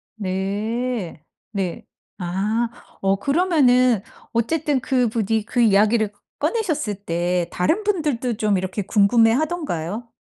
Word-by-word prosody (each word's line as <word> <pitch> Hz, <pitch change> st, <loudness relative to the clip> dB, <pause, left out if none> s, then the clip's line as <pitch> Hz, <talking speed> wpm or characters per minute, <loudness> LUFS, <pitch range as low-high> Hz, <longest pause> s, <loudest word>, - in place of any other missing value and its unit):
네. 205 Hz, 0 st, -3 dB, 0.3 s
네. 190 Hz, -5 st, -3 dB, 0.3 s
아. 200 Hz, +6 st, 0 dB, 0.3 s
어 195 Hz, 0 st, +3 dB
그러면은 255 Hz, -, +3 dB, 0.3 s
어쨌든 285 Hz, +4 st, 0 dB
그분이 225 Hz, -4 st, 0 dB
그 245 Hz, -, -2 dB
이야기를 215 Hz, 0 st, +4 dB, 0.3 s
꺼내셨을 315 Hz, -, -1 dB
때 175 Hz, +1 st, 0 dB
다른 325 Hz, -, +1 dB
분들도 300 Hz, -, 0 dB
좀 210 Hz, -3 st, +2 dB
이렇게 190 Hz, +2 st, -3 dB
궁금해하던가요? 225 Hz, -, +1 dB
225 Hz, 235 characters per minute, -22 LUFS, 195-255 Hz, 0.3 s, 이야기를